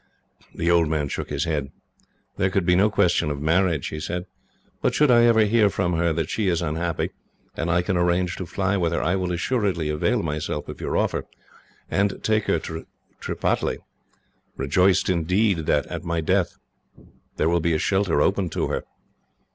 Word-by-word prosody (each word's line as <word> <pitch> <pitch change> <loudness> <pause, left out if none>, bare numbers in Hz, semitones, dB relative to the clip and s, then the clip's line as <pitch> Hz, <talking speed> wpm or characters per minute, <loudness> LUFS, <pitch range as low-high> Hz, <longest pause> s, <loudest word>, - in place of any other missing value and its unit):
The 85 +1 +1
old 85 -2 +4
man 75 -2 -1
shook - - -4
his 70 0 -1
head. 75 -4 -2 0.7
"There 95 - +2
could 95 -1 0
be 90 0 +4
no 100 +4 +4
question 100 -7 +2
of 70 -1 -3
marriage," 85 0 +1
he 75 - -5
said; 90 +3 -4 0.6
"but - - +1
should 150 -3 +4
I 120 -1 +6
ever 115 -2 +5
hear 105 0 +4
from 90 -2 -1
her 85 0 +1
that 80 -1 -1
she 105 +3 -1
is 85 -3 +2
unhappy, 85 +1 -2 0.4
and 80 - -2
I 85 +1 +2
can 95 +1 -1
arrange 90 +1 +1
to 90 - -5
fly 100 +2 0
with 85 -3 0
her, - - 0
I 85 - +1
will 90 -2 -1
assuredly 90 -4 -1
avail 75 +1 0
myself 75 -1 -3
of - - -8
your - - -1
offer, - - -1 0.6
and 100 0 -1
take 110 -1 +1
her - - +2
to 80 0 -7 0.3
Tripataly; - - -1 0.8
rejoiced 90 +7 +2
indeed 90 0 +1
that, 75 - +2
at - - -6
my 85 0 -1
death, 80 - 0 0.8
there 75 - +2
will 85 +1 +2
be 85 0 +1
a - - +2
shelter 95 -3 +1
open 95 -2 +1
to - - -2
her. - - -2
85 Hz, 185 wpm, -24 LUFS, 80-95 Hz, 0.8 s, I